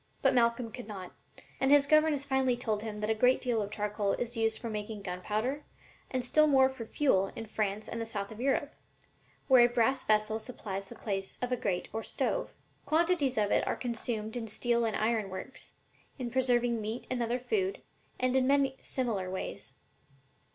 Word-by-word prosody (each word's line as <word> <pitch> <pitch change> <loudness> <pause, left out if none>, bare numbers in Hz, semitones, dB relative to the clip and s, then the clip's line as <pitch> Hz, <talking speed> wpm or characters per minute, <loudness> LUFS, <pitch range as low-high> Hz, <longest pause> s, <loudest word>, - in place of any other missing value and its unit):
But - - +5
Malcolm 235 -1 +2
could 245 -1 -8
not 190 -4 -7 0.2
think, - - -19
and 270 - +2
his 285 0 +7
governess 305 -1 +3
finally 265 -3 +2
told 220 -4 -1
him 210 -1 -5
that 215 +1 0
a - - +4
great 250 +4 +4
deal 240 -4 0
of 205 - -3
charcoal 205 -1 -1
is 240 0 -3
used 225 -1 +1
for 235 - -6
making 210 -1 -5
gun 180 -1 -4
powder, 240 +10 -1 0.5
and 255 -2 -2
still 305 +4 +4
more 265 -2 +5
for 255 -4 -8
fuel 220 -7 +2
in 225 - -5
France 215 -1 -2
and 230 - -4
the 225 - -4
South 200 -2 -4
of 220 - -9
Europe, 275 +2 0 0.7
where 255 -3 +7
a 240 - +5
brass 245 +2 +2
vessel 215 +1 +2
supplies 195 -5 -6
the - - -9
place 195 -2 -4
of 250 0 -3
a - - +3
grate 195 -6 -2
or 225 - -2
stove. - - -1 0.4
Quantities 315 -5 +2
of 205 -1 +2
it - - +2
are - - +1
consumed 225 -2 -3
in 235 -2 -3
steel 235 +2 0
and 220 - -1
iron 220 -2 0
works, 190 +7 -8 0.4
in 250 -3 -4
preserving 245 -2 +2
meat 220 +3 -4
and 250 -1 0
other 235 +1 0
food, 385 - -1 0.4
and 255 0 +1
in 260 -1 +3
many 275 -1 +3
similar 220 -8 -2
ways. 185 0 -6
235 Hz, 200 wpm, -31 LUFS, 215-260 Hz, 0.7 s, his